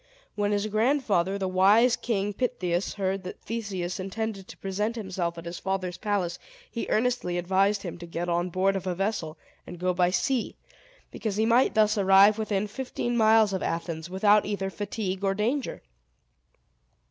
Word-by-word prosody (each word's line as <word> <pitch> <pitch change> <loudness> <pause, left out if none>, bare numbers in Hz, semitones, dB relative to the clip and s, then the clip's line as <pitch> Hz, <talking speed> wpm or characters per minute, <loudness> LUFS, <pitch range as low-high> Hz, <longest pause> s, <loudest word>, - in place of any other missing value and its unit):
When 205 0 0
his 205 0 0
grandfather, 215 -4 +1
the 190 -1 -2
wise 205 +6 +5
King 205 -3 -2
Pittheus, 190 -7 -1
heard 195 -1 -1
that 185 - -8
Theseus 195 -6 -4
intended 195 +1 -4
to - - -11
present 210 +4 -2
himself 185 -6 -3
at 165 - -8
his 170 0 -6
father's 190 -2 -3
palace, 200 -5 -1 0.3
he 235 - -4
earnestly 225 -6 0
advised 195 +3 +1
him 175 -2 -6
to 175 - -8
get 170 +1 -4
on 175 +1 0
board 190 +2 +1
of 190 0 -4
a 180 - -1
vessel, 195 -5 -2 0.3
and 175 - -8
go 180 +1 0
by 180 0 +2
sea; 235 +7 0 0.6
because 215 -3 -3
he 220 +1 +2
might 240 +3 +3
thus 215 -1 +3
arrive 200 +2 +6
within 210 -2 0
fifteen 240 +2 -3
miles 220 -2 +5
of 190 - -2
Athens, 165 0 -3
without 205 +3 +4
either 195 -2 -3
fatigue 200 -1 -4
or 195 0 +1
danger. 240 +7 -2
195 Hz, 170 wpm, -27 LUFS, 185-215 Hz, 0.6 s, arrive